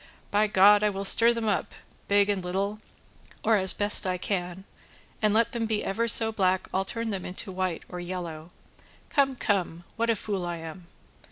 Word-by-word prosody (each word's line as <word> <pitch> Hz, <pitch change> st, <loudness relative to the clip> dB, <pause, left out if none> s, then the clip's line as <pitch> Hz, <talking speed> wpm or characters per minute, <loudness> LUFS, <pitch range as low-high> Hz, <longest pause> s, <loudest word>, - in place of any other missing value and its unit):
By 210 Hz, +1 st, +2 dB
God 205 Hz, +1 st, +5 dB
I 210 Hz, -, +3 dB
will 195 Hz, 0 st, -5 dB
stir 230 Hz, +4 st, +6 dB
them 230 Hz, -2 st, -3 dB
up, 205 Hz, -, -2 dB, 0.3 s
big 200 Hz, 0 st, +3 dB
and 200 Hz, -3 st, -1 dB
little, 195 Hz, +4 st, -3 dB, 0.6 s
or 225 Hz, 0 st, +3 dB
as 190 Hz, -1 st, +5 dB
best 205 Hz, -1 st, +1 dB
I 185 Hz, 0 st, -1 dB
can, 180 Hz, -1 st, -4 dB, 0.6 s
and 215 Hz, -1 st, +2 dB
let 225 Hz, +2 st, +2 dB
them 230 Hz, -2 st, -2 dB
be 220 Hz, -1 st, -1 dB
ever 230 Hz, +4 st, -1 dB
so 225 Hz, 0 st, +4 dB
black 190 Hz, -3 st, 0 dB
I'll 190 Hz, +1 st, 0 dB
turn 230 Hz, +2 st, -4 dB
them 190 Hz, -2 st, -4 dB
into 185 Hz, +1 st, -4 dB
white 185 Hz, -2 st, -3 dB
or 180 Hz, -, -8 dB
yellow. 175 Hz, -3 st, -6 dB, 0.6 s
Come, 275 Hz, -2 st, +1 dB
come, 180 Hz, -7 st, -2 dB
what 230 Hz, 0 st, 0 dB
a 230 Hz, -, +3 dB
fool 200 Hz, -2 st, -4 dB
I 175 Hz, 0 st, -3 dB
am!" 165 Hz, +2 st, -10 dB
200 Hz, 190 wpm, -26 LUFS, 185-215 Hz, 0.6 s, stir